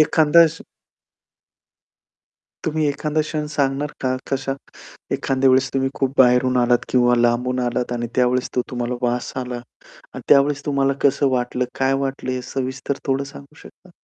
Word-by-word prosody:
एखादा 160 Hz, +2 st, +5 dB
क्ष 165 Hz, +1 st, -7 dB, 2.0 s
तुम्ही 155 Hz, -1 st, 0 dB
एखादा 150 Hz, +2 st, -1 dB
क्षण 150 Hz, 0 st, -3 dB
सांगणार 140 Hz, +1 st, 0 dB
का 130 Hz, -1 st, 0 dB
कशा 135 Hz, 0 st, -1 dB, 0.6 s
एखाद्या 135 Hz, 0 st, +1 dB
वेळेस 130 Hz, +1 st, +3 dB
तुम्ही 135 Hz, 0 st, +1 dB
खूप 135 Hz, -1 st, -1 dB
बाहेरून 125 Hz, 0 st, +4 dB
आलात 120 Hz, 0 st, +2 dB
किंवा 125 Hz, -1 st, +3 dB
लांबून 120 Hz, +2 st, +1 dB
आलात 120 Hz, 0 st, -2 dB
आणि 120 Hz, -1 st, -2 dB
त्यावेळेस 125 Hz, 0 st, +1 dB
तो 125 Hz, -, +1 dB
तुम्हाला 120 Hz, 0 st, -3 dB
वास 120 Hz, 0 st, -1 dB
आला 125 Hz, -1 st, -4 dB, 0.6 s
आणि -, -, -7 dB
त्यावेळेस 145 Hz, +1 st, +4 dB
तुम्हाला 140 Hz, -2 st, +1 dB
कसं 140 Hz, 0 st, +3 dB
वाटलं, 125 Hz, 0 st, -1 dB
काय 135 Hz, 0 st, +2 dB
वाटलं 135 Hz, -1 st, -3 dB
हे 130 Hz, -, -3 dB
सविस्तर 130 Hz, +1 st, -4 dB
थोडं 135 Hz, 0 st, +1 dB
सांगू 140 Hz, +1 st, -12 dB
शकता? 185 Hz, -, -17 dB
130 Hz, 150 wpm, -21 LUFS, 125-140 Hz, 2.0 s, एखादा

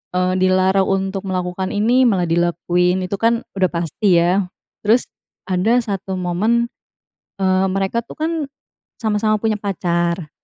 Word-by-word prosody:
eee, 185 Hz, 0 st, +1 dB
dilarang 185 Hz, +1 st, +3 dB
untuk 195 Hz, 0 st, -1 dB
melakukan 185 Hz, 0 st, -2 dB
ini, 240 Hz, +5 st, +3 dB
malah 180 Hz, -6 st, +1 dB
dilakuin, 175 Hz, +2 st, +1 dB
itu 190 Hz, -, -3 dB
kan 230 Hz, 0 st, +2 dB, 0.2 s
udah 185 Hz, -1 st, +3 dB
pasti, 170 Hz, +2 st, +1 dB
ya. 185 Hz, +3 st, +2 dB, 0.4 s
Terus, 230 Hz, +4 st, +3 dB, 0.4 s
ada 210 Hz, +7 st, +2 dB
1 195 Hz, -4 st, -4 dB
momen, 220 Hz, +7 st, +1 dB, 0.7 s
eee, 185 Hz, 0 st, +2 dB
mereka 195 Hz, +4 st, 0 dB
tuh, -, -, -10 dB
kan, 320 Hz, +2 st, 0 dB, 0.7 s
sama-sama 215 Hz, -1 st, +1 dB
punya 220 Hz, -1 st, 0 dB
pacar. 175 Hz, -4 st, -1 dB
190 Hz, 130 wpm, -19 LUFS, 180-215 Hz, 0.7 s, dilarang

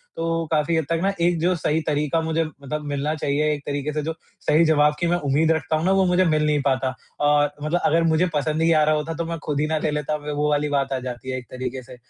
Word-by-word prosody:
तो 165 Hz, 0 st, -1 dB
काफ़ी 155 Hz, +1 st, +1 dB
हद 160 Hz, -, 0 dB
तक 165 Hz, 0 st, +1 dB
न 195 Hz, -, +2 dB
एक 175 Hz, -1 st, +2 dB
जो 180 Hz, +3 st, +2 dB
सही 160 Hz, 0 st, 0 dB
तरीक़ा 150 Hz, +1 st, 0 dB
मुझे 160 Hz, 0 st, 0 dB
मतलब 150 Hz, 0 st, -6 dB
मिलना 145 Hz, +1 st, -1 dB
चाहिए, 150 Hz, +1 st, 0 dB
एक 145 Hz, -, -5 dB
तरीक़े 145 Hz, +1 st, -2 dB
से 150 Hz, -, -1 dB
जो 160 Hz, -, -2 dB, 0.3 s
सही 160 Hz, +2 st, +3 dB
जवाब 150 Hz, -1 st, +3 dB
की 175 Hz, -, +1 dB
मैं 175 Hz, +1 st, +2 dB
उम्मीद 150 Hz, +1 st, +1 dB
रखता 160 Hz, 0 st, 0 dB
हूँ 155 Hz, +2 st, -1 dB
न -, -, +3 dB
वो 190 Hz, -, +4 dB
मुझे 180 Hz, +1 st, +3 dB
मिल 155 Hz, -2 st, +2 dB
नहीं 150 Hz, -1 st, +2 dB
पाता। 135 Hz, -1 st, +1 dB, 0.3 s
अ, 145 Hz, 0 st, +3 dB
मतलब 165 Hz, +4 st, 0 dB
अगर 165 Hz, +2 st, +3 dB
मुझे 165 Hz, +2 st, +3 dB
पसंद 155 Hz, +1 st, 0 dB
ही 165 Hz, -, +3 dB
आ 155 Hz, -, +4 dB
रहा 155 Hz, 0 st, +3 dB
होता 150 Hz, +2 st, -2 dB
तो 170 Hz, +1 st, -3 dB
मैं 165 Hz, 0 st, -4 dB
ख़ुद 145 Hz, -2 st, -1 dB
ही 155 Hz, -, +1 dB
ना 160 Hz, -, 0 dB
ले 155 Hz, -, +1 dB
लेता? 150 Hz, 0 st, -2 dB
वो 150 Hz, 0 st, -2 dB
वाली 150 Hz, 0 st, +1 dB
बात 140 Hz, -1 st, 0 dB
आ 130 Hz, -, -1 dB
जाती 125 Hz, +1 st, -7 dB
है 130 Hz, -, -2 dB
एक 125 Hz, -, -8 dB
तरीक़े 130 Hz, 0 st, -5 dB
से। 125 Hz, +1 st, -12 dB
150 Hz, 275 wpm, -23 LUFS, 145-160 Hz, 0.3 s, वो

